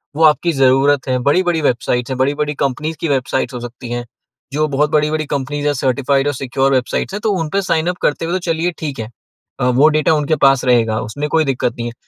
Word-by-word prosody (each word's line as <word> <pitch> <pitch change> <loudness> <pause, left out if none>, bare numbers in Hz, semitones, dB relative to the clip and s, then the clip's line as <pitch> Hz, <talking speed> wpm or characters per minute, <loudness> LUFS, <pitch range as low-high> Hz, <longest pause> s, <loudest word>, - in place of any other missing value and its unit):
वो 160 - +1
आपकी 155 +2 +4
ज़रूरत 135 +1 +3
है। 130 -1 +1
बड़ी-बड़ी 175 0 +2
वेबसाइट्स 125 -1 0
हैं, 130 - -2
बड़ी-बड़ी 145 +3 0
कंपनीज़ 150 +4 -2
की - - -2
वेबसाइट्स 130 -2 -1
हो 125 - -5
सकती 120 +1 -8
हैं, 120 0 -3 0.5
जो 155 +1 +1
बहुत 145 +1 +1
बड़ी-बड़ी 155 0 +1
कंपनीज़ 145 +1 -3
हैं, 145 - +2
सर्टिफ़ाइड 135 +1 0
और 145 - 0
सिक्योर 135 +1 0
वेबसाइट, 130 +9 -1
तो 215 - +2
उनपे 165 +5 -1
साइन 170 -2 0
अप 180 - -3
करते 150 +2 0
हुए 170 - -2
तो 185 - 0
चलिए 165 +2 0
ठीक 145 -5 -5
है, 110 - -5 0.5
वो 125 +4 +4
डाटा 155 +1 +2
उनके 150 0 +1
पास 135 -2 +4
रहेगा, 115 -3 +2
उसमें 135 +7 -4
कोई 160 +1 +2
दिक्कत 125 -3 -1
नहीं 120 - -4
है। 120 - -6
140 Hz, 215 wpm, -17 LUFS, 130-155 Hz, 0.5 s, आपकी